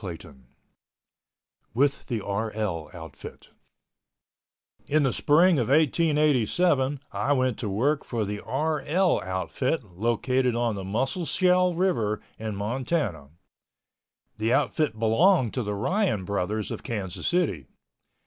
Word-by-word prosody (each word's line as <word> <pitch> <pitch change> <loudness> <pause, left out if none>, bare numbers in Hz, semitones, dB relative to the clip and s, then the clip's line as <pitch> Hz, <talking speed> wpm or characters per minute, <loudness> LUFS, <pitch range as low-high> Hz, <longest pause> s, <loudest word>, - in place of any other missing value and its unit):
CHAPTER 85 -2 -7
IV 70 - -17 1.4
WITH 140 +2 +1
THE 115 -5 -2
RL 100 -5 -3
OUTFIT 80 -5 -11 1.4
In 155 +1 +2
the 135 - +1
spring 165 +2 +4
of 120 - 0
1887 150 - +2
I 145 - 0
went 130 -4 0
to 105 - -3
work 135 +9 +1
for 115 -3 -2
the 105 +1 -4
"RL" 155 - 0
outfit 100 - -2
located 120 +6 0
on 120 -1 0
the 100 -2 -5
Musselshell 180 - +1
River 165 - 0 0.2
in 110 -1 -4
Montana. 105 - -2 1.1
The 110 +2 0
outfit 140 -2 +1
belonged 120 - +3
to 130 - -1
the 105 -2 -3
Ryan 145 - 0
Brothers 100 +2 -2
of - - -5
Kansas 95 -5 -4
City. 125 - 0
120 Hz, 120 wpm, -26 LUFS, 105-150 Hz, 1.4 s, spring